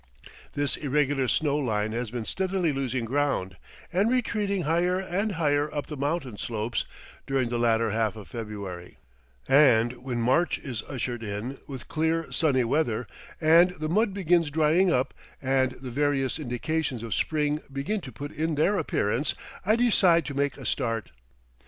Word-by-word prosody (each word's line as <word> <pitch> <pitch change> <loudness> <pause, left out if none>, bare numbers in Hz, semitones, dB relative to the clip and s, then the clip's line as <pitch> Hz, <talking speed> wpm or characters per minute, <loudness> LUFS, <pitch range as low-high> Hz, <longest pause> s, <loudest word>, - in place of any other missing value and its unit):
This 145 -2 0
irregular 145 -2 +1
snow 145 +2 +1
line 110 -6 0
has 120 0 -3
been 120 -1 -4
steadily 185 - 0
losing 130 -3 -2
ground, 130 -8 0 0.4
and 195 +5 +3
retreating 210 -6 0
higher 175 +4 +2
and 190 +3 -1
higher 150 -3 +1
up 145 - -3
the 150 - -6
mountain 140 -5 -2
slopes 110 0 -2 0.4
during 135 -3 +1
the 120 0 -1
latter 115 -1 +2
half 110 -1 0
of 105 -3 -10
February, 100 -6 -7 0.5
and 125 -4 +5
when 125 -2 -2
March 130 +9 +2
is 120 -7 -5
ushered 120 -3 -3
in, 110 +6 -4
with 135 -3 -8
clear 160 +1 0
sunny 140 -6 +2
weather, 120 -2 0 0.3
and 170 +3 +5
the 155 0 -2
mud 210 +5 +2
begins 175 -4 +2
drying 160 +5 +3
up 130 -2 +1 0.3
and 130 -1 +1
the 130 -1 -8
various 140 +1 0
indications 135 -1 -2
of 115 - -3
spring 150 -1 0
begin 140 +10 -2
to 130 - -9
put 145 +6 -7
in 160 0 -1
their 185 +7 +2
appearance, 115 +8 0 0.3
I 215 +4 +3
decide 190 - +4
to 145 - -4
make 140 +1 0
a - - -9
start. 115 - -1
140 Hz, 160 wpm, -27 LUFS, 120-165 Hz, 0.5 s, and